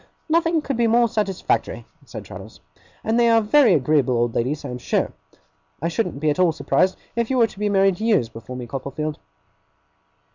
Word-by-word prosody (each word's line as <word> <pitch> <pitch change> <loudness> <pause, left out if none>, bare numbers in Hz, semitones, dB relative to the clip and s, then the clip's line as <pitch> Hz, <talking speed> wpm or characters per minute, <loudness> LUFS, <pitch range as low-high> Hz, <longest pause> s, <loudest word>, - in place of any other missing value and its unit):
'Nothing 330 -1 +1
could 275 -4 -3
be 235 -1 +2
more 235 +1 +4
satisfactory,' 210 -4 -2 0.2
said - - -8
Traddles; - - -11 0.4
'and 225 +2 +1
they 235 -1 +4
are 230 0 +5
very 225 0 +4
agreeable 130 -3 +2
old 120 0 0
ladies, 140 +6 -2
I - - -5
am 125 0 -6
sure. - - -1 0.7
I 165 - -1
shouldn't 175 -4 -2
be 155 0 +1
at 145 - -3
all 180 -2 +4
surprised 185 +3 0 0.2
if 235 -1 -1
you 265 - 0
were 235 - +5
to 205 - -10
be 210 0 0
married 195 -2 +2
years 215 - +2
before 115 +3 -10
me, 125 -1 -6
Copperfield. 140 +4 -5
190 Hz, 190 wpm, -22 LUFS, 140-230 Hz, 0.7 s, are